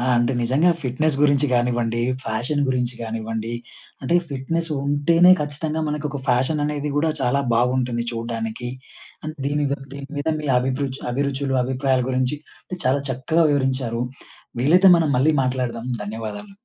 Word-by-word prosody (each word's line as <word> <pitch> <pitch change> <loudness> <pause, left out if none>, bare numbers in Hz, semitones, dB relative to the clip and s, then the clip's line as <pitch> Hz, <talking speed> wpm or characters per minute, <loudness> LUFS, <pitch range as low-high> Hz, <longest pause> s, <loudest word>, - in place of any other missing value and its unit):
ఆ! 125 - -1
అంటే 120 +2 +2
నిజంగా 135 +9 +3
ఫిట్‌నెస్ 135 +3 +2
గురించి 145 0 +4
గానివ్వండి, 120 -1 +1 0.2
ఫ్యాషన్ 120 +7 -1
గురించి 125 -1 0
గానివ్వండి 115 0 -4 0.5
అంటే 170 +7 +2
ఫిట్‌నెస్ 165 +5 -2 0.2
ఉంటేనే 165 +5 +4
ఖచ్చితంగా 150 +2 -3
మనకొక 150 -1 -3
ఫ్యాషన్ 130 +5 +2
అనేది 150 0 -2
గూడా 160 +2 +2
చాలా 135 +2 +1
బాగుంటుంది 125 0 +1
చూడ్డానికి. 115 +1 -4 0.6
అండ్ 155 0 -5
దీని 145 +1 0
ద 140 - 0 0.2
దీని 140 0 -8
మీద 145 - -2
మీ 150 - -5
అభిరుచు 130 +1 -2
అభిరుచులు 140 0 -1
అభిప్రాయాల 130 0 0
గురించి 130 +2 0 0.5
చాలా 135 +2 +2
చక్కగా 160 +6 +1
వివరించారు. 130 -4 0 0.6
వీలైతే 180 +8 +6
మనం 160 -3 +1
మళ్ళీ 150 +4 +3
మాట్లాడదాం. 125 -2 -2 0.2
ధన్యవాదాలు. 110 - -6
130 Hz, 135 wpm, -22 LUFS, 120-150 Hz, 0.6 s, వీలైతే